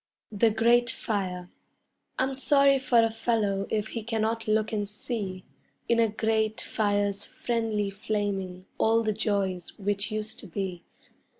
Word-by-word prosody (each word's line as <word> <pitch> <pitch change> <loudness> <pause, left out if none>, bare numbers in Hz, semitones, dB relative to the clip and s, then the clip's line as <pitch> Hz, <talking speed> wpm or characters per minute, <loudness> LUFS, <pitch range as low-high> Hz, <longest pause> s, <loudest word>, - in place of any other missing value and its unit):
THE 225 +2 +3
GRATE 235 +2 +4
FIRE 185 -6 -2 0.7
I'm 265 +1 +1
sorry 275 +1 +4
for 245 -3 +4
a 225 - +2
fellow 220 -4 0
if 215 0 -1
he 230 - -4
cannot 225 0 -1
look 215 0 +2
and 205 -2 -1
see 205 -4 -5 0.4
In 235 - +3
a 225 -1 +4
grate 220 0 0
fire's 205 -1 0
friendly 220 -4 -1
flaming 195 -3 -3
all 225 +1 +3
the 215 -1 +1
joys 195 -4 -1
which 205 0 -1
used 215 +1 -3
to 205 - -9
be. 185 -1 -4
215 Hz, 140 wpm, -27 LUFS, 200-230 Hz, 0.7 s, GRATE